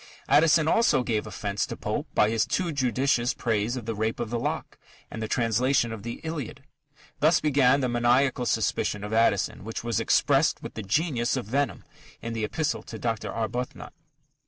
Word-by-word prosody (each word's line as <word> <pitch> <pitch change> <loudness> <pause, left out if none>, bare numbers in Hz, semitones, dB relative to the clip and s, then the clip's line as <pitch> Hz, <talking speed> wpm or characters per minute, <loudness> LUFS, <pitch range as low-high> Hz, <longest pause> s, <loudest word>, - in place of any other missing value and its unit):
Addison 155 +2 +4
also 225 - +3
gave 110 -3 -1
offence 100 -1 -3
to - - -6
Pope - - -3
by 105 - +4
his 115 -1 +1
too 180 -3 -1
judicious 130 -2 +1
praise 115 0 -1
of 120 - -6
The 115 - -2
Rape 110 +1 -2
of 120 -2 -3
the 120 - -1
Lock - - -4 0.3
and 110 - -6
the 110 - -2
translation 120 +1 +1
of 110 -2 -6
the 115 +2 -6
Iliad. 155 -3 -5 0.6
Thus 155 +2 +4
began 140 -2 +3
the 130 - +1
maniacal 125 +1 +2
suspicion 105 -1 0
of 105 +1 -5
Addison, 110 -5 +2
which 115 +2 -5
was 115 -3 0
expressed - - +2
with - - -7
the 110 - -5
genius 125 - 0
of 125 - -3
venom 140 +6 -1 0.4
in 115 - -5
the 110 -1 -2
_Epistle 155 +4 -2
to 110 - -8
Dr. 115 -1 -2
Arbuthnot. 120 +3 -4
120 Hz, 180 wpm, -26 LUFS, 110-140 Hz, 0.6 s, Addison